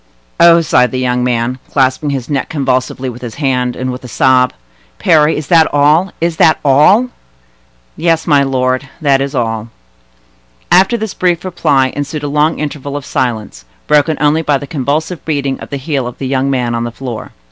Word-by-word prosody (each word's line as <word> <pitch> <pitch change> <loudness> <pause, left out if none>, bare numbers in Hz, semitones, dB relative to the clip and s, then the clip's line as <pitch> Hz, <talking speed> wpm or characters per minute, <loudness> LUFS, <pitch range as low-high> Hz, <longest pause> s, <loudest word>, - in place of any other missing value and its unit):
"Oh!" 170 0 +6
sighed 130 -5 +2
the 130 - -4
young 125 -1 0
man, 125 +1 -1
clasping 130 +1 +1
his 135 -4 -3
neck 140 -3 -2
convulsively 130 -2 -1
with 125 -1 -7
his 120 -3 -7
hand, 125 -4 -1
and 130 0 -3
with 125 +1 -8
a - - -8
sob. 125 +1 +2 0.5
"Parry, 155 - +3
is 150 - -4
that 165 -2 +4
all?—is 160 +3 +1
that 160 - +4
all?" 170 - +4 0.9
"Yes, 165 -1 0
my 145 -3 +4
lord; 130 0 -1
that 140 -4 +2
is 140 +1 -3
all." 115 -2 -2 1.0
After 195 +6 +4
this 220 -2 -4
brief 175 -1 0
reply 140 -7 +1
ensued 145 +1 -4
a - - -2
long 150 +3 +1
interval 145 -1 -4
of 140 - -8
silence, 115 - -3 0.2
broken 150 +1 +2
only 150 +2 +2
by 150 -3 +1
the 140 - -7
convulsive 150 +4 -2
beating 140 -4 -2
of - - -9
the 140 - -4
heel 135 -2 -2
of 125 - -8
the 135 - -5
young 135 +1 0
man 125 -3 -1
on 115 0 -2
the 120 - -4
floor. 120 -2 -7
140 Hz, 185 wpm, -14 LUFS, 130-155 Hz, 1.0 s, Oh